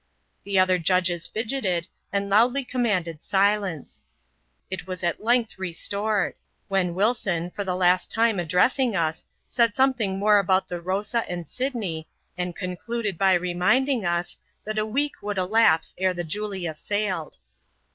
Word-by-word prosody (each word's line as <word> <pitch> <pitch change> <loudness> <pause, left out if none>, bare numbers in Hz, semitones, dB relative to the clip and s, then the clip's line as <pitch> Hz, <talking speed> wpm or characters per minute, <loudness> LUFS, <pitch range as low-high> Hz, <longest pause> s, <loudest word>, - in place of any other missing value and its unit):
The 200 -1 0
other 185 -1 +4
judges 175 0 +1
fidgeted, 215 -7 -1 0.2
and 200 0 -1
loudly 245 +7 +3
commanded 195 -11 -1
silence. 200 -5 0 0.7
It 190 -1 -5
was 185 0 -6
at 170 +3 -1
length 235 -3 +1
restored; 200 +3 -1 0.4
when 185 -3 +1
Wilson, 190 -5 0
for 205 - -4
the 185 -2 -2
last 180 0 +2
time 225 -3 +2
address 180 - +2
ing 250 -5 +1
us, 160 -2 -1 0.2
said 235 -3 +2
something 245 -8 +2
more 205 +1 +5
about 190 -1 +2
the 175 -1 -5
Rosa 205 +6 -1
and 175 -2 -5
Sydney, 210 - -3 0.3
and 180 -1 -3
concluded 200 +3 -3
by 190 -1 +5
reminding 185 +9 +1
us, 175 -1 -1 0.3
that 215 0 -2
a 215 - -1
week 285 +6 -2
would 205 -1 -3
elapse 185 -3 +3
ere 185 -1 +1
the 175 - -3
Julia 190 -1 -3
sailed. 190 -1 -3
195 Hz, 145 wpm, -25 LUFS, 180-220 Hz, 0.7 s, more